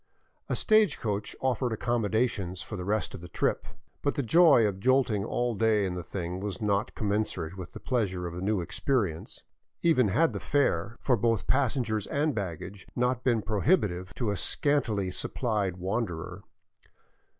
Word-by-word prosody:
A -, -, +1 dB
stage 215 Hz, -7 st, +4 dB
coach 105 Hz, -2 st, -3 dB
offered 130 Hz, -1 st, 0 dB
accommodations 110 Hz, -5 st, -1 dB
for 110 Hz, -, -7 dB
the 90 Hz, -, -5 dB
rest 105 Hz, +3 st, -1 dB
of -, -, -8 dB
the 90 Hz, -, -8 dB
trip; -, -, -1 dB, 0.3 s
but 145 Hz, -, 0 dB
the 140 Hz, -, 0 dB
joy 150 Hz, -2 st, +6 dB
of 100 Hz, -2 st, -1 dB
jolting 125 Hz, -3 st, +2 dB
all 120 Hz, +2 st, -1 dB
day 110 Hz, -1 st, +2 dB
in 90 Hz, -, -2 dB
the 90 Hz, -, -4 dB
thing 90 Hz, +1 st, -5 dB
was 100 Hz, -1 st, -4 dB
not 105 Hz, -1 st, 0 dB
commensurate 100 Hz, -5 st, -1 dB
with 95 Hz, -2 st, -8 dB
the -, -, -8 dB
pleasure 95 Hz, -8 st, -1 dB
of 85 Hz, -, -5 dB
a 90 Hz, -, -6 dB
new 100 Hz, 0 st, 0 dB
experience, 95 Hz, -, -2 dB, 0.4 s
even 155 Hz, -9 st, +4 dB
had 160 Hz, -, +2 dB
the -, -, -3 dB
fare 110 Hz, -, 0 dB
for 130 Hz, -, +3 dB
both 115 Hz, -1 st, +1 dB
passengers 120 Hz, -6 st, 0 dB
and 150 Hz, +1 st, 0 dB
baggage 95 Hz, -1 st, -5 dB
not 125 Hz, 0 st, 0 dB
been 115 Hz, -4 st, +2 dB
prohibitive 100 Hz, -, +1 dB
to 115 Hz, -5 st, -1 dB
a 100 Hz, -, -2 dB
scan 145 Hz, -, +2 dB
tily 100 Hz, -6 st, -2 dB
supplied 105 Hz, -7 st, -1 dB
wanderer. 90 Hz, -2 st, -3 dB
105 Hz, 170 wpm, -28 LUFS, 95-125 Hz, 0.4 s, joy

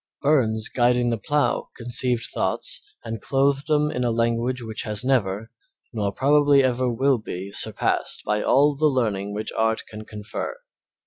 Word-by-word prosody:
Burns 115 Hz, -7 st, +2 dB
guiding 120 Hz, -1 st, +2 dB
the 115 Hz, -, 0 dB
plough 145 Hz, +5 st, 0 dB
conceived 120 Hz, 0 st, +1 dB
thoughts -, -, -1 dB, 0.2 s
and 115 Hz, -2 st, -5 dB
clothed 140 Hz, +1 st, +1 dB
them 150 Hz, -1 st, +2 dB
in 125 Hz, -4 st, -2 dB
a 120 Hz, -, +1 dB
language 115 Hz, +2 st, 0 dB
which 110 Hz, -1 st, -4 dB
has 105 Hz, +2 st, -3 dB
never, 110 Hz, -4 st, 0 dB, 0.4 s
nor 105 Hz, -3 st, -1 dB
probably 145 Hz, +3 st, +4 dB
never 130 Hz, 0 st, +1 dB
will 130 Hz, +2 st, +2 dB
be, 95 Hz, -2 st, -6 dB
surpassed -, -, -1 dB
by 105 Hz, 0 st, 0 dB
all 145 Hz, +2 st, +3 dB
the 155 Hz, +2 st, +3 dB
learning 105 Hz, -7 st, -1 dB
which 105 Hz, +1 st, -4 dB
art 110 Hz, 0 st, 0 dB
can 110 Hz, 0 st, -9 dB
confer. 105 Hz, -, -6 dB
120 Hz, 155 wpm, -24 LUFS, 110-135 Hz, 0.4 s, probably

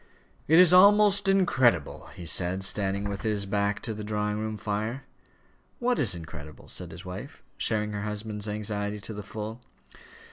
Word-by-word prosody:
"It 160 Hz, -, +5 dB
is 180 Hz, -1 st, +7 dB
almost 200 Hz, +1 st, +6 dB
incredible," 130 Hz, -, +2 dB
he 90 Hz, -, -8 dB
said, 90 Hz, +3 st, +2 dB
standing 100 Hz, +1 st, 0 dB
with 100 Hz, -1 st, -4 dB
his 105 Hz, -3 st, -1 dB
back 100 Hz, +1 st, -1 dB
to 115 Hz, -, -2 dB
the 105 Hz, 0 st, -6 dB
drawing 105 Hz, 0 st, -2 dB
room 110 Hz, 0 st, -3 dB
fire. 110 Hz, +6 st, -3 dB, 0.7 s
"What 245 Hz, 0 st, 0 dB
is 110 Hz, -9 st, +2 dB
incredible?" 75 Hz, -2 st, -10 dB
said -, -, -7 dB
his 85 Hz, +3 st, -11 dB
wife, 90 Hz, +1 st, -8 dB
sharing 105 Hz, -1 st, -1 dB
her 105 Hz, -, -3 dB
husband's 105 Hz, 0 st, -4 dB
anxiety 105 Hz, 0 st, -3 dB
to 110 Hz, -, -8 dB
the 105 Hz, -, -6 dB
full. 110 Hz, +3 st, -7 dB
105 Hz, 165 wpm, -27 LUFS, 100-115 Hz, 0.7 s, is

